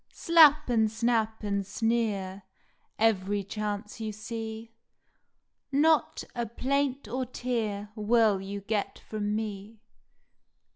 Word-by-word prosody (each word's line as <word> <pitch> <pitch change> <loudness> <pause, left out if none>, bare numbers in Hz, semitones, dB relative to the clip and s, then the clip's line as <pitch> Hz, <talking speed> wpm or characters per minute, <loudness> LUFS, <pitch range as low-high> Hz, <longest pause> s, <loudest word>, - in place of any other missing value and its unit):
Slap 305 -3 +6
and 225 -3 +3
snap 225 -1 0
and 200 -1 -1
sneer 205 -2 -1 0.6
Every 205 -2 +1
chance 210 +1 -4
you 220 -1 -3
see. 220 +1 -6 1.0
Not 305 +2 +3
a 240 -1 -2
plaint 270 +2 -1
or 255 +3 -3
tear 220 -5 -3
Will 215 -2 +3
you 200 +1 -5
get 205 0 -2
from 210 -1 -3
me. 215 0 -5
220 Hz, 105 wpm, -28 LUFS, 205-240 Hz, 1.0 s, Slap